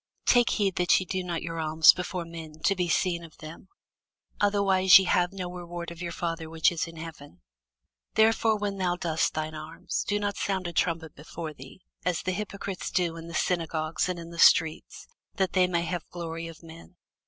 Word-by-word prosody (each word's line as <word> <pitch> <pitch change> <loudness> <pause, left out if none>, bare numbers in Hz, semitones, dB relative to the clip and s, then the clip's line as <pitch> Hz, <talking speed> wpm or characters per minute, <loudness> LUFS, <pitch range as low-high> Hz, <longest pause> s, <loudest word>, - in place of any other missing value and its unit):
Take 245 -1 +5
heed 200 -4 0
that 180 0 +4
ye 185 - -4
do 185 +1 -2
not 175 -2 -3
your 165 0 -4
alms 160 0 +6
before 180 -1 -4
men, 160 -2 -10
to 195 - +3
be 180 -2 -1
seen 170 0 +1
of 165 -2 -14
them: 155 +4 -11 0.7
otherwise 195 -2 +6
ye 190 - +2
have 180 0 +2
no 190 -2 -5
reward 175 -1 -6
of 170 0 -10
your 170 -1 -4
Father 165 -1 -4
which 160 +1 +3
is 170 -1 -2
in 165 - -11
heaven. 155 - -10 0.7
Therefore 220 0 +4
when 205 -1 -3
thou 180 -1 +1
doest 165 -3 -1
thine 155 0 -3
alms, 155 +1 -4
do 205 0 +1
not 205 -1 -2
sound 190 -2 -1
a 175 - -4
trumpet 165 -2 -1
before 155 +1 -7
thee, 185 - -13 0.2
as 180 -3 -1
the 185 - -1
hypocrites 200 0 -5
do 175 -2 0
in 165 0 -9
the 170 - -7
synagogues 165 -1 -1
and 180 - -2
in 170 0 -9
the 170 - -9
streets, 160 -1 +3 0.3
that 190 -3 0
they 185 -1 +4
may 170 -1 0
have 175 -1 -4
glory 165 -1 -5
of 165 0 -12
men. 165 +2 -13
170 Hz, 200 wpm, -27 LUFS, 165-185 Hz, 0.7 s, alms